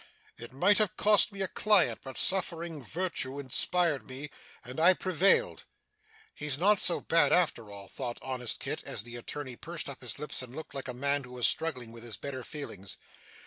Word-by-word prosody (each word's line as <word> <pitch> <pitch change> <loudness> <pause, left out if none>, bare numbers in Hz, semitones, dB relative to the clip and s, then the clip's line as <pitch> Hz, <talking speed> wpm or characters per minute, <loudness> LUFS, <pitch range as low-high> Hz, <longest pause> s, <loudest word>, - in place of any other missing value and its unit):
It 120 - -10
might 185 +11 +4
have 210 -4 +1
cost 210 0 +5
me 195 -1 -3
a - - 0
client. 210 -3 +4
But 135 -1 -7
suffering 170 -5 +1
virtue 145 -4 -3
inspired 150 +3 +1
me, 135 +3 -7 0.3
and 125 +5 -8
I 180 +3 +6
prevailed.' 190 - +2 0.7
'He's 150 -3 -1
not 200 +5 +4
so 175 - +3
bad 165 0 +3
after 140 -11 +2
all,' 100 -1 -9
thought 120 +4 -5
honest 125 -3 -1
Kit, - - -3
as 105 - -4
the 120 +1 -8
attorney 130 +2 -6
pursed 170 0 -5
up 140 -2 -8
his 125 -4 -7
lips 150 -2 -4
and 130 0 -9
looked 160 - -8
like 135 -1 -6
a 125 - -4
man 140 +2 0
who 125 0 -11
was 125 -1 0
struggling 130 -8 -1
with 115 0 -11
his 120 -2 -5
better 135 -2 -6
feelings. 105 -11 -6
140 Hz, 190 wpm, -30 LUFS, 125-175 Hz, 0.7 s, I